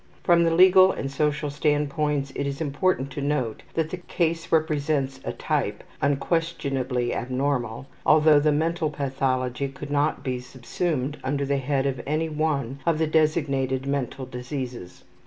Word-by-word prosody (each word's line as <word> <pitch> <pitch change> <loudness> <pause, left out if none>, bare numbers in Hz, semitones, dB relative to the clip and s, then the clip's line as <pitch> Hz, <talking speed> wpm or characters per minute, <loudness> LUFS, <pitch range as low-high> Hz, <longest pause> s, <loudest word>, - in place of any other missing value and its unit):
From 170 -1 +5
the 165 - +3
legal 185 +1 +7
and 135 - -4
social 150 +1 0
standpoints 145 -1 0
it 140 - -2
is 140 0 -4
important 145 -2 0
to 145 - -5
note 140 -6 -1
that 160 -1 0
the 185 - -3
case 170 -1 -2
represents 150 -4 +1
a - - -3
type, - - -2 0.2
unquestionably 140 -5 0
abnormal, 125 -1 -2 0.2
although 155 -1 +6
the 150 +1 +3
mental 160 +2 0
pathology 135 -2 -1
could 140 +1 -8
not 145 +1 +1
be 130 -2 -2
subsumed 130 +3 -3
under 140 +2 -1
the 140 0 +1
head 135 0 0
of 130 -3 -1
any 155 +2 0
one 145 -4 -1
of 165 0 +2
the 160 - +2
designated 145 -4 +1
mental 135 -1 -2
diseases. 125 -5 -6
145 Hz, 150 wpm, -25 LUFS, 135-155 Hz, 0.2 s, legal